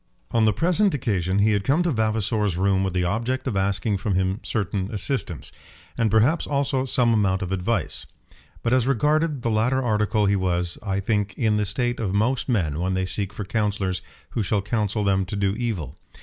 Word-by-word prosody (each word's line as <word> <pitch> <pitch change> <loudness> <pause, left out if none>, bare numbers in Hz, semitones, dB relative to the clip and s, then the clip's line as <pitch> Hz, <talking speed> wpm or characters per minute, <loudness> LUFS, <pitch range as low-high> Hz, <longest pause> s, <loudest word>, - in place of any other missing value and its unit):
On 115 -1 +3
the 110 - +5
present 180 - +2
occasion 95 -7 0
he 105 +2 +4
had 100 -2 +1
come 145 - +2
to 175 - +1
Vavasor's 110 - 0
room 95 0 +2
with 95 -2 -1
the 90 - +1
object 115 +8 -1
of 130 -6 -2
asking 100 +2 0
from 100 0 -1
him 95 +2 0
certain 100 -2 -2
assistance, 100 - -1 0.4
and 115 -1 +1
perhaps 115 - +3
also 140 -2 0
some 125 -3 +3
amount 100 -3 +1
of 90 - -5
advice. 95 +5 -2 0.6
But 120 - +1
as 130 -1 +3
regarded 150 +2 +1
the 115 - 0
latter 120 +5 +2
article 105 -2 +1
he 100 0 +3
was, 90 -2 -1
I 100 -2 -2
think, 105 -1 -1
in 110 -3 +2
the 105 -1 0
state 120 +3 -1
of 100 -4 -1
most 125 +6 +1
men 80 - 0
when 95 +1 0
they 95 0 0
seek 95 +1 -2
for 105 -1 -6
counsellors 100 -3 -1 0.3
who 115 - -1
shall 100 0 0
counsel 105 0 -1
them 95 -1 +2
to 95 +3 -5
do 100 -1 +1
evil. 110 -8 -3
105 Hz, 200 wpm, -24 LUFS, 95-120 Hz, 0.6 s, the